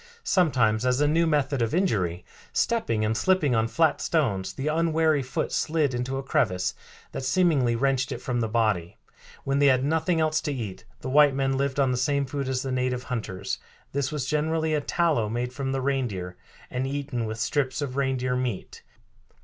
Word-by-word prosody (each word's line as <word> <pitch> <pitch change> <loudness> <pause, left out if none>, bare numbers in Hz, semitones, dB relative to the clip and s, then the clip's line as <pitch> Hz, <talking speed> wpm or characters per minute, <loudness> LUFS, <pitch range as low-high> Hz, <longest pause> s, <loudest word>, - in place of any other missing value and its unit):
Sometimes 125 - +2
as 125 +1 +2
a 145 - +3
new 165 +3 +3
method 145 -4 +1
of 115 +5 0
injury, 90 - 0 0.3
stepping 115 - +1
and 110 +1 0
slipping 150 +2 +2
on 110 -1 +2
flat 155 +8 +2
stones, 100 - 0
the 135 - -4
unwary 160 -1 +2
foot 130 0 -3
slid 155 -4 +1
into 125 +2 -2
a 135 - -4
crevice 90 -8 0 0.4
that - - -4
seemingly 135 -4 +2
wrenched 130 +1 +1
it - - -2
from 125 -2 -2
the 115 - 0
body." 105 -7 0 0.5
When 140 +1 0
they 145 - +5
had 130 -1 +4
nothing 160 +3 +1
else 155 -1 +1
to 150 - -2
eat 115 -6 -5 0.2
the 130 - -4
white 145 -1 +6
men 135 0 +1
lived 140 +1 -1
on 135 -2 +3
the 125 - 0
same 140 +2 +1
food 135 0 -3
as 130 -1 -1
the 135 - -3
native 125 0 -1
hunters. 110 -7 -4 0.3
This 140 0 -1
was 150 -4 -2
generally 155 +2 0
a 150 - +1
tallow 150 -9 +1
made 120 +2 -3
from 135 0 -3
the 135 0 -1
reindeer, 120 -10 -2 0.4
and 130 +1 -2
eaten 135 -4 -3
with 110 0 -4
strips 130 +5 0
of 140 -3 -3
reindeer 130 -2 0
meat. 125 -6 -4
135 Hz, 190 wpm, -26 LUFS, 120-150 Hz, 0.5 s, white